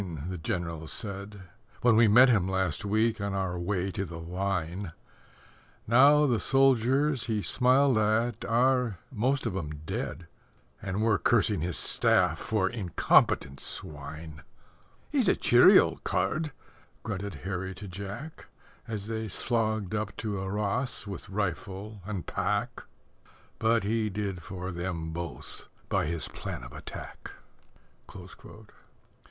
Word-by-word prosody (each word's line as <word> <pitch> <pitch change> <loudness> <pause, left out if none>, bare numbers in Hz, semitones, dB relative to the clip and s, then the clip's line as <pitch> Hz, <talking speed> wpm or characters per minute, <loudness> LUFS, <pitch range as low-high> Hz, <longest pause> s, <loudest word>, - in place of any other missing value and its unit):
the 90 -2 -5
General 85 -1 -3
said 100 0 -6 0.4
When 120 -2 +5
we 115 0 +6
met 120 +6 +7
him 100 -7 +3
last 95 0 0
week 110 +2 +1
on 100 -1 -2
our 90 -2 -2
way 95 +1 -1
to 95 - -3
the 85 -3 -7
Line, 90 0 -3 0.9
Now 140 +6 +6
the 120 -6 +2
soldiers 135 +1 +3
he 110 -3 -1
smiled 130 -1 +3
at 110 +1 +1
are 125 -2 +2
most 130 +3 0
of 110 -5 -2
'em 75 -5 -5
dead, 85 - -4 0.6
And 95 +3 -2
we're 110 -3 +3
cursing 105 -6 +2
his 85 +1 -1
staff - - +3
for 105 -4 0
incompetent 90 - +2
swine. 75 +1 -6 0.7
"He's - - +2
a - - +5
cheery - - +7
old - - +2
card," 155 -1 0 0.5
grunted 100 -2 -4
Harry 95 0 -3
to 100 +2 -8
Jack 100 - -8 0.4
As 105 -3 -4
they 110 0 -3
slogged 110 -1 -1
up 105 -1 -3
to 105 -4 -3
Arras 105 +7 -2
with 100 -4 -7
rifle 100 +1 -4
and 100 -6 -4
pack. - - -2 0.7
But 115 -1 +2
he 110 +1 0
did 100 -3 -3
for 90 +2 -6
them 85 -2 -4
both 85 -2 -7 0.2
by - - +1
his 85 0 -3
plan - - -6
of 60 +1 -10
attack. - - -9 0.7
Mr. 110 +1 -12
100 Hz, 135 wpm, -28 LUFS, 90-115 Hz, 0.9 s, met